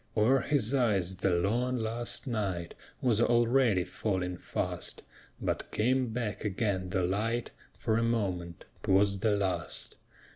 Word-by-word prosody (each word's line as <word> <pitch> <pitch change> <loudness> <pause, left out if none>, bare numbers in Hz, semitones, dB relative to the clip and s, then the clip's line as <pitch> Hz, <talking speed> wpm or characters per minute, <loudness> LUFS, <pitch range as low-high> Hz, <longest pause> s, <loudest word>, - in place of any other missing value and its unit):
O'er 120 +6 +5
his 135 -5 +1
eyes 100 -8 +2
the 95 - +1
long, 115 +9 +1
last 115 +1 -1
night 100 -9 -2 0.3
Was 115 -3 +3
already 120 -4 +3
falling 90 0 -2
fast; - - -4 0.4
But - - -2
came 130 +3 +1
back 115 -2 -3
again 95 -3 -1
the 95 0 0
light 110 +6 -1 0.3
For 110 +1 +1
a - - +1
moment; 95 -8 -1 0.2
'twas 100 +1 +3
the 105 0 +2
last. 95 -4 -2
105 Hz, 135 wpm, -30 LUFS, 95-120 Hz, 0.4 s, O'er